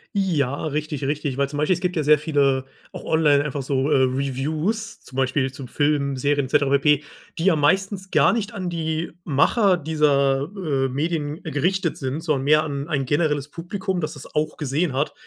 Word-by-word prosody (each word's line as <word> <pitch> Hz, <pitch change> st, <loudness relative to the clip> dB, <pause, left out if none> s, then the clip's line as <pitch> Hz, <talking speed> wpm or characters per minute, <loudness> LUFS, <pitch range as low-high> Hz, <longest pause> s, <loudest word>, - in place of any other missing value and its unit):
Ja, 155 Hz, -8 st, 0 dB
richtig, 150 Hz, -1 st, -3 dB
richtig. 145 Hz, -1 st, -2 dB
Weil 140 Hz, -, +1 dB
zum 145 Hz, -, -5 dB
Beispiel 150 Hz, +5 st, +2 dB
es 175 Hz, -, -8 dB
gibt 180 Hz, -1 st, -1 dB
ja 155 Hz, -, +1 dB
sehr 150 Hz, +1 st, +6 dB
viele, 140 Hz, -3 st, +1 dB, 0.3 s
auch -, -, -8 dB
online, 150 Hz, -3 st, +3 dB
einfach 145 Hz, -1 st, -3 dB
so, 135 Hz, +2 st, 0 dB
äh, -, -, +5 dB
Reviews, 145 Hz, -, -1 dB
zum 130 Hz, -, -12 dB
Beispiel 130 Hz, 0 st, +1 dB
zu 130 Hz, -1 st, -9 dB
Filmen, 145 Hz, -1 st, 0 dB
Serien, 145 Hz, +1 st, +1 dB
et -, -, -9 dB
cetera 145 Hz, -2 st, +2 dB
pp., 150 Hz, +1 st, +3 dB, 0.3 s
die 165 Hz, -, -2 dB
ja 190 Hz, -, +5 dB
meistens 190 Hz, +5 st, +1 dB
gar -, -, +4 dB
nicht 220 Hz, -2 st, -2 dB
an 185 Hz, -4 st, -4 dB
die 160 Hz, 0 st, -2 dB
Macher 180 Hz, -, +3 dB
dieser, 145 Hz, -2 st, +1 dB
äh, 140 Hz, -8 st, -1 dB
Medien 150 Hz, +2 st, -2 dB
gerichtet 170 Hz, +3 st, 0 dB
sind, 135 Hz, +4 st, -3 dB
sondern 150 Hz, -5 st, 0 dB
mehr 155 Hz, +1 st, +5 dB
an 140 Hz, 0 st, -4 dB
ein 140 Hz, -4 st, -1 dB
generelles 145 Hz, 0 st, 0 dB
Publikum, 185 Hz, +1 st, -3 dB
das 155 Hz, -, -3 dB
das 145 Hz, -, -11 dB
auch 150 Hz, +1 st, -1 dB
gesehen 150 Hz, +2 st, -1 dB
hat 140 Hz, +3 st, -1 dB
150 Hz, 195 wpm, -23 LUFS, 140-165 Hz, 0.3 s, sehr